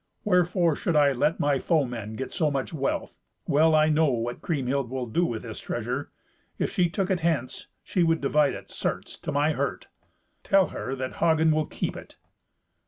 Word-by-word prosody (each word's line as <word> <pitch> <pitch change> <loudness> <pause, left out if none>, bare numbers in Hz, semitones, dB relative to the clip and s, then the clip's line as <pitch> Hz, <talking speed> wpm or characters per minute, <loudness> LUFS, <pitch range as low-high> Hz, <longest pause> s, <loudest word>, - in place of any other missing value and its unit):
Wherefore 180 -4 +2
should 170 +1 -1
I 145 -2 +5
let 145 +5 +1
my 145 -2 +2
foemen 120 - -1
get 135 - -5
so 160 -5 +1
much 140 +2 -3
wealth. 140 -3 -2 0.3
Well 155 +2 +4
I 155 0 +4
know 155 0 +3
what 120 -1 -2
Kriemhild 140 -4 -1
will 130 -1 -3
do 120 +10 0
with 115 - -4
this 110 -3 -7
treasure. 120 +4 -3 0.5
If - - -1
she 175 -2 +2
took 195 +2 -1
it 185 - +1
hence, 160 -7 -1 0.2
she 180 - -1
would 165 -1 +3
divide 145 0 +2
it, - - -11
certes, - - -3
to - - -4
my 145 +2 +2
hurt. 140 -3 -3 0.5
Tell 195 -4 +3
her 135 - -4
that 130 -1 -5
Hagen 160 -1 +3
will 155 -1 +1
keep - - -3
it." - - -11
150 Hz, 185 wpm, -26 LUFS, 130-165 Hz, 0.5 s, I